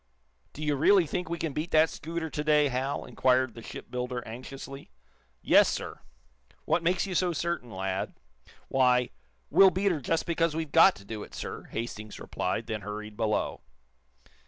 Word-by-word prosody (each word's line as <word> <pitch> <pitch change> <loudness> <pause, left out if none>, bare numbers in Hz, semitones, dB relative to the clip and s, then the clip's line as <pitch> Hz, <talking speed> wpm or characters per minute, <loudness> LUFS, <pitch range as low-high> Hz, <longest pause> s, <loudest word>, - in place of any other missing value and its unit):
"Do 155 - -7
you 150 -1 +1
really 180 +6 +5
think 175 +2 -3
we 170 - -2
can 160 -3 -3
beat 155 +4 -3
that 160 -1 +5
scooter 165 +1 -5
to 150 - -2
day, 150 -1 +4
Hal?" 135 +2 -2
inquired 130 -2 +2
the 115 - -10
shipbuilder, 125 +1 -5
anxiously. 135 +4 -8 0.5
"Yes, - - +6
sir." - - -4 0.7
"What 165 +2 +2
makes 175 +3 +1
you 195 - -4
so 180 -1 +1
certain, 170 -5 -2
lad?" 95 -2 -3 0.5
"Why, 125 -2 +3 0.4
we'll 190 +5 +8
beat 190 +2 +1
her 155 -4 -2
just 165 +6 0
because 165 -2 +1
we've 160 -3 -3
got 165 +4 +7
to 100 - -14
do 110 0 -6
it, - - -10
sir," - - -6
Hastings 110 -2 -6
replied, 100 +5 -2
then 110 -2 -4
hurried 105 +1 -6
below. 110 -1 -1
140 Hz, 170 wpm, -28 LUFS, 120-165 Hz, 0.7 s, we'll